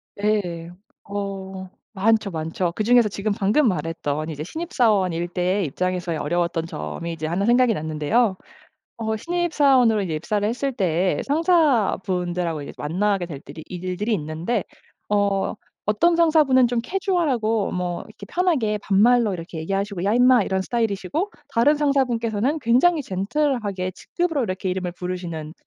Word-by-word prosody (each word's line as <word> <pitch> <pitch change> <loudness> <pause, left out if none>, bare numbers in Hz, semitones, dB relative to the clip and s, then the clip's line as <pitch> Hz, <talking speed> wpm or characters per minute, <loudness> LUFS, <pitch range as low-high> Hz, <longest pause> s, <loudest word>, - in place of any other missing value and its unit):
네. 195 -5 -1 0.3
어 195 -2 -5 0.2
많죠, 215 0 +2
많죠. 165 +2 -2
그 215 - -1
중에서 240 0 +5
지금 205 +1 -2
방금 220 +8 +3
말했던 160 -3 -2
이제 150 -1 -5
신입 330 - -6
사원일 190 - +2
때의 180 +2 0
입장에서의 180 +2 -2
어려웠던 170 +1 -1
점이 170 +1 -5
이제 160 -1 -4
1 180 +5 0
생각이 240 0 +4
났는데요. 160 +7 +1 0.6
어 220 -1 -2
신입 345 +5 -2
사원으로 255 -7 +4
이제 175 -5 -3
입사를 205 +6 -1
했을 260 +5 -1
때 185 -3 0
상사분들하고 195 - +1
이제 - - -8
만나게 185 +4 0
될들이 150 0 -9
일들이 185 +5 -3
있는데 165 +6 -2 0.4
어 200 -1 +1 0.3
어떤 335 +12 +3
상사분은 305 -7 +4
좀 235 -1 0
캐주얼하고 270 - 0
뭐 180 -1 -2
이렇게 - - -12
편하게 290 - +1
반말로 210 +2 +3
이렇게 165 -1 -7
얘기하시고 195 +2 -2
"야 205 - +2
임마." 245 -2 +5
이런 190 -1 -1
스타일이시고 225 - -1 0.2
다른 270 +3 +3
상사분께서는 260 -2 +1
굉장히 265 +7 +3
젠틀하게 200 -3 -1
직급으로 325 - -2
이렇게 185 -2 -3
이름을 180 -1 -3
부르시는 175 -4 -5
200 Hz, 355 characters per minute, -23 LUFS, 175-245 Hz, 0.6 s, 중에서